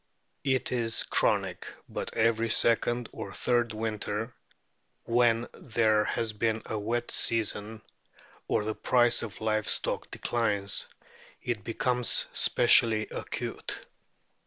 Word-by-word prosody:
It 130 -2 0
is 115 -2 0
chronic, - - 0 0.2
but - - -6
every 115 0 +2
second 120 +1 +1
or 100 - -7
third 120 -2 +1
winter, 110 +1 -3 0.7
when 120 0 +2
there 110 -2 +1
has 115 -2 -2
been 110 +1 -1
a 110 - -3
wet 120 +3 -2
season, 110 -1 0 0.6
or - - +1
the 110 +1 -2
price 120 +1 +2
of 110 -3 -7
live 110 -1 0
stock - - +1
declines, 100 -4 -1 0.6
it 120 -5 -3
becomes 125 +1 +1
specially 110 -2 +5
acute. - - -5
115 Hz, 110 wpm, -28 LUFS, 110-120 Hz, 0.7 s, specially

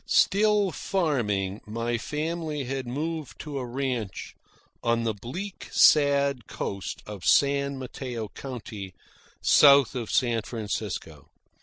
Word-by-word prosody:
Still 205 -1 +3
farming, 110 - -1
my 115 +2 -2
family 155 +2 -3
had 130 0 -4
moved 155 +3 -4
to 145 -3 -5
a 125 - -4
ranch 125 -5 -3 0.5
on 115 -1 +1
the 115 -1 0
bleak 170 - -7
sad 140 -4 +4
coast 100 -1 -5
of 105 -3 -8
San 140 +3 +3
Mateo 125 -3 -5
County, 110 -8 -8 0.5
south 140 -3 +7
of 120 -4 -4
San 120 -3 +2
Francisco. 110 -2 -5
130 Hz, 115 wpm, -27 LUFS, 115-150 Hz, 0.5 s, south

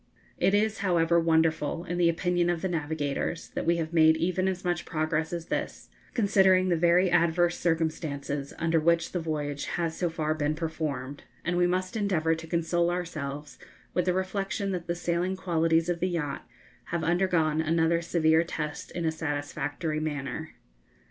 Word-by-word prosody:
It 195 - +3
is, 215 +1 +1
however, 170 -3 +3
wonderful, 160 -1 +1
in 175 0 -3
the 170 -1 +5
opinion 175 +1 +1
of 175 0 -1
the - - +1
navigators, 160 -1 -2
that - - -4
we 170 0 +3
have 165 0 -3
made 160 -1 +5
even 185 +3 0
as 185 -1 -2
much 175 -1 0
progress 155 -1 -1
as 170 -1 -4
this, - - -4 0.3
considering 190 -4 +4
the 175 - +3
very 175 +2 +3
adverse 175 0 +3
circumstances 155 -4 -1
under 165 0 +2
which 165 +1 +2
the 180 - -1
voyage 150 -3 -3
has 165 -2 -1
so 175 - 0
far 155 -1 -1
been 155 -1 -1
performed, 150 -4 -4 0.2
and 175 - 0
we 175 0 +3
must 185 +3 -1
endeavour 180 -7 +1
to 165 0 -6
console 170 +1 +1
ourselves 155 -5 -4 0.3
with 180 - +1
the 180 - +2
reflection 195 +1 -2
that 180 -2 -4
the 170 - -1
sailing 175 +2 -1
qualities 165 -2 +1
of 175 -1 -1
the 185 +2 0
yacht 150 -5 -3 0.4
have 170 -1 -3
undergone 165 -2 +2
another 165 +1 +2
severe 160 -1 +3
test 150 -3 -5
in 170 -1 -4
a 160 - +2
satisfactory 150 0 -3
manner. 155 +1 -4
165 Hz, 170 wpm, -28 LUFS, 155-175 Hz, 0.4 s, the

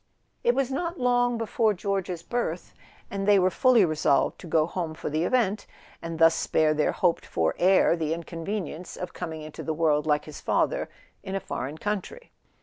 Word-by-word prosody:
It 240 - +3
was 270 -1 0
not 340 +5 -3
long 245 -1 +2
before 225 -1 +1
George's 185 -3 -3
birth, 185 -8 -3 0.4
and 195 0 -3
they 205 -1 +6
were 185 0 +3
fully 245 -4 +5
resolved 155 -3 +1
to - - -10
go 155 -1 +3
home 170 -2 -4
for 150 - -5
the 155 +3 0
event, 215 -3 +1 0.3
and 165 -1 -5
thus 165 0 +6
spare 155 -1 +2
their 150 0 +1
hoped 175 -2 +1
for 80 -1 0
heir 185 -2 +4
the 160 -2 -2
inconvenience 170 +1 -5
of 180 -1 -6
coming 160 -2 -6
into 155 0 -8
the 160 - -3
world, 150 -2 +2
like 150 -1 +1
his 155 - -9
father, - - 0 0.3
in 190 - -5
a - - 0
foreign 145 -4 -5
country. 210 - -4
180 Hz, 185 wpm, -26 LUFS, 160-210 Hz, 0.4 s, they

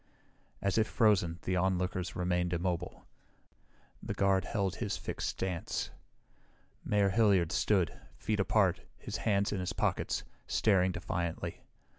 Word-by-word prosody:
As 100 +2 +2
if 110 - +3
frozen, 95 -8 +3
the 95 - 0
onlookers 90 0 0
remained 90 0 0
immobile. 90 0 -2 1.0
The - - -4
guard 95 -1 +2
held 100 -4 -1
his 105 -4 -2
fixed - - -3
stance. 90 -3 -3 0.9
Mayor 100 -1 +2
Hilliard 100 -5 +3
stood, 95 -6 +1 0.2
feet 105 -1 -1
apart, 95 -2 +3 0.2
his - - -5
hands 100 -2 +1
in 100 - -1
his 90 - -2
pockets, - - 0 0.2
staring 95 -4 +3
defiantly. 85 -2 -3
95 Hz, 125 wpm, -32 LUFS, 90-100 Hz, 1.0 s, if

